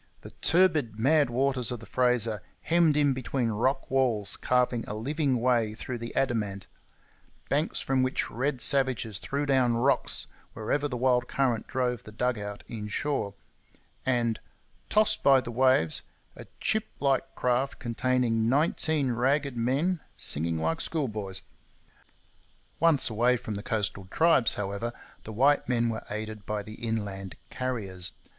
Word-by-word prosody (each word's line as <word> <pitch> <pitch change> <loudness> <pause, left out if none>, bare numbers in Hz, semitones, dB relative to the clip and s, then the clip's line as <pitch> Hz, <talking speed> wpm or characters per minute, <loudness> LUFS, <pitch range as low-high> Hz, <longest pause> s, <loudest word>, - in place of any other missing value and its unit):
The - - -10
turbid, 160 - +3
mad 145 +4 +3
waters 130 0 +1
of 120 - -4
the 115 - -11
Fraser 120 -5 +1 0.2
hemmed 165 -3 +3
in 145 -2 +3
between 130 -1 -2
rock 130 +6 0
walls, 120 -6 +1
carving 125 -2 +1
a 105 - -4
living 135 +3 0
way 115 -3 +1
through 120 +2 -5
the 115 0 -7
adamant; 105 -7 -1 0.8
banks 150 +3 0
from 130 -1 +1
which 130 +1 -1
red 130 +1 -1
savages 130 -8 +3
threw 140 +1 -2
down 130 -4 +3
rocks 130 +4 0 0.3
wherever 140 +6 -1
the 125 -3 -4
wild 125 0 +2
current 125 -5 0
drove 125 -2 -1
the 110 - -12
dug 125 +1 -1
out 105 0 -6
inshore; 105 0 -3 0.7
and, 120 -3 +1 0.5
tossed 215 0 +3
by 135 -1 +6
the 120 - -6
waves 130 -10 +3 0.3
a - - -11
chip 220 0 0
like 135 -1 0
craft 125 +2 0
containing 120 -2 0
nineteen 150 0 +2
ragged 135 +3 +1
men 140 +10 0 0.2
singing 80 +2 0
like 80 0 -1
schoolboys! 105 - -3 1.4
Once 165 -4 +4
away 120 +3 +3
from 115 -2 -6
the 100 - -4
coastal 105 -4 -2
tribes, 160 -6 +3
however, 100 +4 -3 0.3
the 110 - -6
white 135 +7 +3
men 120 -1 +2
were 110 - -4
aided 110 0 -5
by 105 -1 -2
the 110 - -9
inland 100 -4 -3 0.2
Carriers. 100 -8 -4
125 Hz, 145 wpm, -28 LUFS, 110-135 Hz, 1.4 s, by